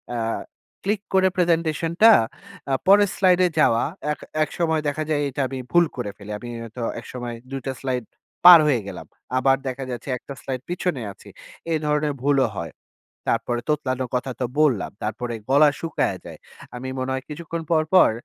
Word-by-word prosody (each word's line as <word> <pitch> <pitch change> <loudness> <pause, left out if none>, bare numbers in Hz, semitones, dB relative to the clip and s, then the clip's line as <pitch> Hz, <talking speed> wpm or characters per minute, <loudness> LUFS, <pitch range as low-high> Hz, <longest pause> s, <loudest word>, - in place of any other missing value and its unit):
আ - - -1 0.7
click 200 +1 0
করে 190 0 +5
প্রেজেন্টেশনটা 170 +2 +3 0.6
আ - - +2
পরের 205 +1 +6
স্লাইডে 185 -1 +4
যাওয়া, 115 -6 +4 0.3
এক - - -4 0.2
একসময় 160 -1 -1
দেখা 150 +2 -1
যায় 150 -2 +1
এইটা 140 +1 -3
আমি 130 0 -5
ভুল 175 0 +5
করে 110 -5 -3
ফেলি। 105 0 -9
আমি 120 - -9
হয়ত 115 +1 -10 0.2
একসময় 120 -2 -6
দুই 135 - -4
টা 135 - -2
স্লাইড 130 -2 -2 0.4
পার 175 -2 +12
হয়ে 135 -5 +3
গেলাম। - - -7 0.3
আবার 135 +1 +4
দেখা 130 +1 -4
যাচ্ছে 120 +2 -6
এক - - -20
টা 140 - -5
স্লাইড 130 -2 -4
পিছনে 175 -6 -2
আছি। - - -15 0.4
এ - - +2
ধরনের 150 0 +1
ভুলও 140 -2 +3
হয়। 85 - -4 0.6
তারপরে 120 -1 0
তোতলানোর 130 -4 -1
কথা 130 +1 -1
তো - - +2
বললাম। 140 -9 +2
তারপরে 120 +3 -3 0.2
গলা 145 +2 +6
শুকাইয়া 165 - -1
যায়। - - -9 0.4
আমি 125 +2 -6
মনে 130 +1 -2
হয় 130 0 -3
কিছুক্ষণ 165 +2 -5
পর, 160 -1 +4
পর 185 - +7
140 Hz, 175 wpm, -23 LUFS, 125-165 Hz, 0.7 s, পার